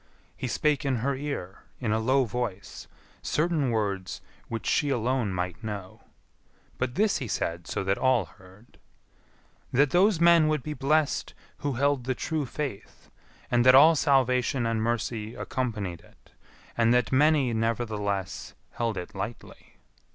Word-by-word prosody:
He 130 - -4
spake 150 +3 +1
in 135 -2 0
her 140 -1 +1
ear, 130 -10 -5 0.2
in 115 -4 -1
a 110 - +2
low 130 +4 +2
voice, 110 -4 -5 0.3
certain 155 -4 0
words 100 -5 -2 0.3
which 115 -3 -5
she 145 - +1
alone 125 -3 0
might 90 +3 -4
know; 100 -4 -6 0.8
but 130 -1 -2
this 210 -1 +2
he 130 - -4
said 85 -4 -3
so - - -2
that 95 +1 0
all 130 -6 +3
heard, 95 +6 -19 0.9
"That 140 +2 +3
those 185 0 +4
men 170 -2 +6
would 155 -4 0
be 150 - -4
blessed 150 +1 0 0.2
who 145 -1 -2
held 140 0 +1
the 130 0 -1
true 155 +1 -2
faith, 135 -7 -6 0.4
and 120 0 +4
that 130 +1 +7
all 155 +4 +8
salvation 130 -3 +2
and 115 -1 0
mercy 115 -1 -2
accompanied 105 -9 -3
it; - - -24 0.4
and 115 0 +3
that 125 -3 +1
many, 140 -2 +3
nevertheless, 105 -4 -2 0.2
held 115 -3 -2
it 90 - -6
lightly." 105 +4 -8
120 Hz, 150 wpm, -27 LUFS, 105-140 Hz, 0.9 s, all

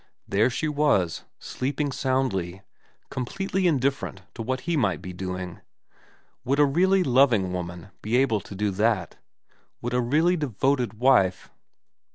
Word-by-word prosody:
There 105 +5 +3
she 145 +5 -2
was, 145 - +1
sleeping 145 +2 -3
soundly, 115 -9 -1 0.5
com 130 - -2
pletely 195 +6 -2
indifferent 135 - 0
to 115 - -7
what 130 +3 -2
he 170 0 -1
might 105 -10 +1
be 90 - -8
doing. 90 -1 -5 0.8
Would 135 +2 0
a 145 - +6
really 185 +6 +3
loving 120 - +3
woman 90 0 -6
be 110 +3 +1
able 130 -5 +2
to 100 - -10
do 105 +1 0
that? 100 -3 0 0.7
Would 120 +1 -2
a 125 - +2
really 155 +9 +2
devoted 130 - 0
wife 110 -6 +2
125 Hz, 145 wpm, -25 LUFS, 95-140 Hz, 0.8 s, a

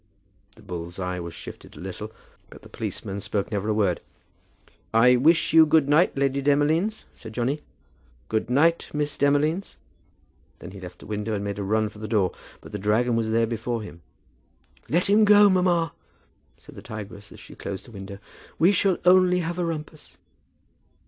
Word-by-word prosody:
The - - -18
bull's 85 -1 -7
eye 90 -1 -3
was 85 -1 -7
shifted - - -11
a - - -12
little, - - -7 0.4
but - - -14
the - - -14
policeman 100 +1 -5
spoke 100 +1 -3
never 105 0 -2
a - - +2
word. 100 -5 +1 0.9
"I 125 +3 +6
wish 160 +7 +3
you 160 0 +9
good 150 -2 +4
night, 150 +2 +3
Lady 140 0 +1
Demolines," 155 +9 +1
said 110 -2 -11
Johnny. 130 +6 -1 0.7
"Good 110 +1 -1
night, 160 +6 +2
Miss 150 0 -1
Demolines." 150 +6 +1 0.8
Then 90 - -10
he 100 - -10
left 90 -1 -10
the - - -14
window 105 +1 -3
and 100 - -3
made 100 0 -4
a - - -2
run 110 +2 +1
for 105 0 -12
the 110 - -5
door. 100 -4 +1 0.3
But - - -12
the 105 - -5
dragon 110 +4 +1
was 115 -1 0
there 115 +1 +2
before 115 0 -3
him. 85 -5 -11 0.9
"Let 175 +4 +1
him 210 +2 +5
go, 205 -1 +7
mamma," 175 -4 +2 0.6
said - - -16
the - - -10
tigress 105 -2 -9
as - - -13
she - - -13
closed 95 -1 -7
the 120 - -14
window. 100 -1 -8 0.4
"We 175 +4 +5
shall 195 -1 +2
only 180 0 +5
have 170 +1 -4
a 175 - 0
rumpus." 155 -1 -7
120 Hz, 180 wpm, -25 LUFS, 105-160 Hz, 0.9 s, you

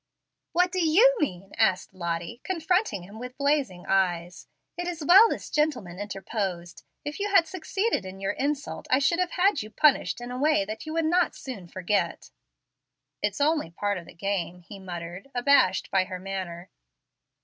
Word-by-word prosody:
"What 360 +1 +2
do 370 -1 0
YOU 425 +11 +6
mean?" 195 - -3
asked 185 - +2
Lottie, 170 +5 -4
confronting 360 - 0
him 205 +5 -11
with 250 +1 -8
blazing 280 -11 0
eyes. 180 -2 0 0.3
"It 350 0 -4
is 335 -4 -4
well 390 +8 +8
this - - -5
gentleman 250 - -1
interposed. 195 -3 -4 0.2
If 290 +4 -5
you 410 +1 -1
had 390 -4 +5
succeeded 385 - -1
in 190 0 -9
your 195 0 -1
insult 285 0 -3
I 260 - +5
should 335 +5 +2
have 365 -2 0
had 375 -3 +3
you 215 - -8
punished 275 +3 +3
in 240 0 -7
a 250 - -4
way 300 -8 +3
that 215 +8 -7
you 310 - -4
would 325 0 +1
not 350 +3 +2
soon 215 -10 -8
forget." 185 +3 -2 0.9
"It's - - -1
only 300 - +2
part 205 +3 -2
of 170 - -13
the - - -14
game," 180 -1 -3
muttered 180 -1 -7
he, - - +1
abashed 245 -8 +3
by 190 -1 +3
her 185 -1 -6
manner. 185 -2 -6
220 Hz, 175 wpm, -27 LUFS, -, 0.9 s, well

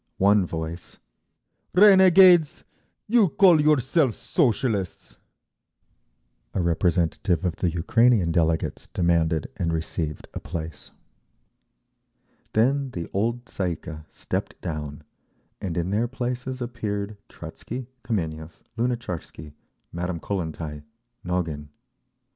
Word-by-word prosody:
One 100 -1 +4
voice, 80 +1 -6 0.8
"Renegades, 185 -4 +7 0.4
you 220 -4 +4
call 175 -3 +5
yourselves 145 - +2
Socialists!" 115 - -1 1.4
A - - +1
representative 85 +1 +1
of 90 - -1
the 90 - +1
Ukrainean 95 +3 +3
delegates 80 -1 0
demanded, 85 -3 0
and 85 -1 -1
received, 80 -1 -3
a - - -4
place. 80 -3 -7 1.6
Then 135 +5 +2
the 85 -9 -5
old 115 +4 -1
Tsay 90 -5 -2
ee - - -5
kah 80 -2 -9
stepped - - -4
down, 75 -2 -5 0.6
and 90 -3 -3
in 85 +2 -1
their 110 +4 +1
places 125 +1 -4
appeared 105 -4 -4
Trotzky, 125 +2 -8 0.2
Kameniev, 80 -7 -4 0.2
Lunatcharsky, 90 -11 -4 0.4
Madame 85 0 -3
Kollentai, 80 -5 -4 0.4
Nogin…. 80 -5 -3
95 Hz, 100 wpm, -25 LUFS, 80-125 Hz, 1.6 s, Renegades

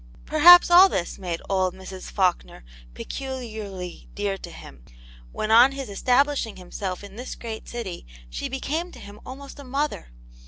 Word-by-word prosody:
Perhaps, 350 +4 +8
all 365 +3 +9
this 175 - -3
made 175 -3 -4
old 185 -2 0
Mrs. 190 0 -9
Faulkner 180 - -1 0.3
peculiarly 220 - -7
dear 205 -1 -1
to 185 - -10
him, 65 - -13 0.5
when 215 - -3
on 245 +4 +7
his 270 -4 -6
establishing 250 +3 +1
himself 185 +1 -6
in 200 +1 -11
this 250 +2 -6
great 225 -2 -8
city, 210 - -6 0.2
she - - -5
became 315 +6 -3
to - - -12
him 205 +1 -12
almost 275 +2 -10
a - - -9
mother. 280 - -3
220 Hz, 155 wpm, -24 LUFS, 190-275 Hz, 0.5 s, all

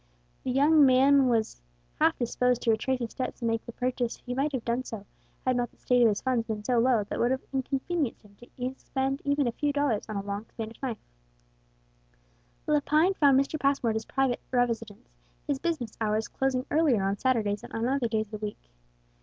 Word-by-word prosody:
The - - -3
young 290 +4 +5
man 270 +1 +5
was 225 - 0 0.4
half - - +3
disposed 250 0 0
to 230 - +3
retrace 255 +4 0
his 235 -2 -4
steps 255 -1 -5
and 230 - +1
make 225 0 -1
the - - -5
purchase; 250 0 -2
he 250 - -6
might 275 +4 0
have 260 -5 -3
done 240 +2 0
so, 220 -5 -7 0.4
had 255 -1 +2
not 245 0 0
the - - -29
state 250 -1 +2
of 235 - +7
his 205 - -2
funds 250 -3 0
been 215 -2 -4
so 240 +2 +2
low 235 -3 +3
that 200 - -5
it - - -4
would 240 - +3
have 260 +1 -2
inconvenienced 270 +1 -2
him 205 -1 -19
to 240 - -16 0.2
expend 265 +1 -2
even 285 -1 +2
a - - +1
few 290 +5 -1
dollars 285 -8 0
on 215 - -4
a 200 - -2
long 200 +2 -5
Spanish 225 0 -8
knife. 250 -5 -2 1.7
Lepine 300 +4 +3
found 280 -6 +5
Mr. 275 +3 -1
Passmore 275 -4 +2
at - - -3
his 220 0 -2
private 270 -2 0
residence, 230 -3 -1 0.4
his 285 -2 -1
business 310 -10 -2
hours 215 0 0
closing 265 -1 -1
earlier 290 -10 +3
on 195 +1 -1
Saturdays 215 -6 +1
than - - -11
on 225 +1 -1
other 265 -2 +1
days 220 -1 0
of 215 - -4
the - - -12
week. 135 - -12
250 Hz, 210 wpm, -28 LUFS, 225-270 Hz, 1.7 s, of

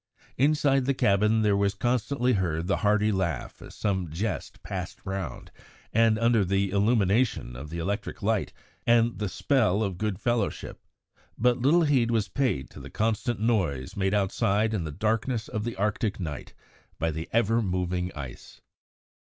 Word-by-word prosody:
Inside 140 -1 +3
the 140 0 +1
cabin 105 +1 +3
there 105 -1 +3
was 100 0 +1
constantly 125 +3 +1
heard 85 -5 -1
the 100 - +1
hearty 105 0 +2
laugh 95 -4 -2
as - - -11
some 95 -5 -1
jest 95 +9 -4
passed - - -5
round, 95 -3 -5 0.4
and 115 0 +4
under 115 -2 +3
the 95 +1 0
illumination 100 - +1
of 70 +4 -8
the 85 - -5
electric 100 +5 -3
light 110 -1 0 0.4
and 115 0 +3
the 105 -2 -1
spell 110 -4 +2
of 95 -4 -3
good 105 -3 -2
fellowship, 120 -3 -2 0.6
but 125 +2 +2
little 160 +7 +4
heed 135 -6 +3
was 110 -5 0
paid 120 - 0
to - - -11
the - - -9
constant 110 +1 -1
noise 90 - 0
made 95 +1 +1
outside 100 +2 +1
in 95 -6 -1
the 75 - -4
darkness 110 - -1
of 110 0 -3
the 120 - -3
Arctic 105 +1 -1
night 75 -6 -6 0.4
by 80 0 0
the 80 +1 -5
ever 115 0 +2
moving 90 -2 -1
ice. 70 -4 -9
105 Hz, 160 wpm, -27 LUFS, 95-115 Hz, 0.6 s, and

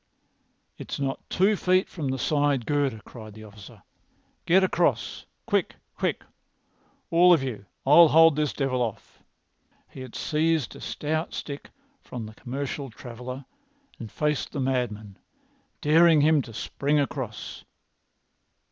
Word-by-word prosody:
"It's - - -6
not 135 -1 -4
two 200 +3 +3
feet 185 -1 +2
from 155 -6 -5
the 135 0 -1
side 145 -2 +1
girder," 140 -6 0
cried 110 -3 -11
the 110 - -11
officer. 105 -1 -14 0.6
"Get 190 +3 +5
across! 175 -8 0 0.2
Quick! - - 0 0.2
Quick! - - -2 0.9
All 175 +2 +6
of 155 -6 +2
you. 110 -7 -5 0.2
I'll 160 +5 +8
hold 165 0 +6
this 150 -1 0
devil 130 -3 -1
off!" 115 -4 -5 0.7
He - - -13
had 130 -3 -9
seized 155 +4 0
a - - -11
stout 155 +2 -3
stick 140 -1 -7 0.3
from 120 -3 -7
the 110 - -10
commercial 135 +3 -5
traveller 125 +3 -8 0.5
and 115 -3 -8
faced 150 -1 -1
the 145 - -3
madman, 120 -6 -2 0.6
daring 160 +1 +5
him 155 0 +4
to 120 - -10
spring 145 +6 0
across. 130 -6 -4
140 Hz, 135 wpm, -26 LUFS, 120-155 Hz, 0.9 s, I'll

